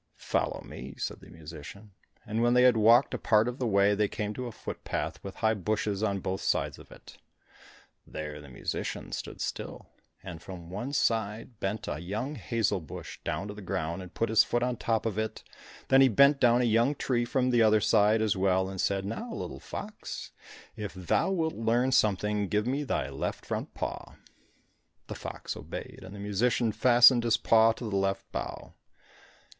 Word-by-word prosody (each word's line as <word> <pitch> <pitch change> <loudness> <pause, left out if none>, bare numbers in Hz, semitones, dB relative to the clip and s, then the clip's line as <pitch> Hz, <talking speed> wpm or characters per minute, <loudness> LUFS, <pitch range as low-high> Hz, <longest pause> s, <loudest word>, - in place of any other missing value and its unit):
"Follow - - -2
me," - - -9
said - - -4
the - - -15
musician; 80 +6 -11 0.3
and 110 +2 -1
when 120 +1 +3
they 125 - +6
had 125 -2 +6
walked 115 +4 +5
a - - -2
part 110 0 +3
of 125 +2 -4
the 125 - 0
way, 100 -1 +4
they 105 0 +2
came 105 +1 -3
to 125 +2 -5
a - - -6
footpath, - - -5
with 100 - -7
high 110 -1 +2
bushes 105 0 -1
on 100 -3 0
both 95 +1 -3
sides - - 0
of - - -15
it. - - -14 0.9
There 75 -1 -6
the 70 - -12
musician 60 - -4
stood - - -6
still, - - -5 0.3
and 85 -4 -8
from 85 -2 -9
one 120 +8 -4
side 115 -2 -1
bent 100 +3 -3
a 75 - -3
young 105 - -3
hazel 115 -8 0
bush 80 - -9
down 100 - -3
to - - -5
the 105 - -10
ground, 85 -1 -3
and 90 - -10
put 115 - -1
his 110 - +6
foot 120 0 0
on 125 0 +1
the 120 - -10
top 115 -1 0
of 110 -2 -1
it, 110 0 -3 0.5
then 135 0 +7
he 135 - +8
bent 140 +5 +5
down 120 -1 +5
a - - +2
young 120 +5 +3
tree 125 -3 0
from 130 0 +1
the 120 -1 +4
other 110 -1 +5
side 110 +1 +3
as 105 -1 +1
well, 95 0 +2
and 95 -1 -3
said, 95 -1 0
"Now 225 - -5
little - - -5
fox, 210 0 -7 0.4
if 105 -3 -6
thou 90 - +1
wilt 165 -4 0
learn 120 +3 +1
something, 105 -2 +2
give 105 +2 0
me 135 +4 -1
thy 75 - -2
left 70 - -4
front - - -4
paw." - - -5 0.9
The - - -6
fox - - -6
obeyed, - - -8
and 95 +2 -10
the - - -9
musician 110 +3 +1
fastened 120 +2 +6
his 115 -1 +3
paw 115 0 +5
to 115 - -6
the 100 - -2
left 95 0 0
bough. - - -5
110 Hz, 195 wpm, -29 LUFS, 100-120 Hz, 0.9 s, he